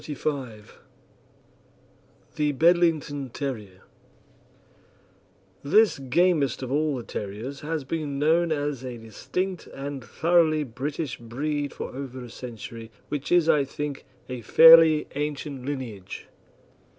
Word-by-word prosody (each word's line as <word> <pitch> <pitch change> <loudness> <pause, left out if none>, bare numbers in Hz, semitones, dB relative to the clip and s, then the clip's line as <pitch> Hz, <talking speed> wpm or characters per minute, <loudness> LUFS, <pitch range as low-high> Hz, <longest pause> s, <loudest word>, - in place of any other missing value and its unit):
CHAPTER 150 - -6
XXXV 130 -8 -3 1.7
THE 150 -1 +1
BEDLINGTON 160 -3 +2
TERRIER 105 -10 -5 1.8
This 210 +5 +4
gamest 140 -1 +1
of 130 - -5
all 150 -1 +1
the 120 - -6
terriers 110 +7 -6
has 155 0 -3
been 145 -1 -3
known 165 +3 +2
as 145 -3 -2
a 125 -2 -6
distinct 175 - -4
and 135 -1 -6
thoroughly 160 +1 +2
British 140 +2 -4
breed 145 +5 -3
for - - -7
over 130 -2 -6
a 120 - -10
century, 115 -2 -8 0.2
which 145 -1 -4
is, 175 -2 +4
I 150 -3 +4
think, 145 +1 -5 0.2
a 125 -1 -6
fairly 160 +4 +8
ancient 145 -2 -4
lineage. 120 -10 -6
145 Hz, 115 wpm, -26 LUFS, 125-155 Hz, 1.8 s, fairly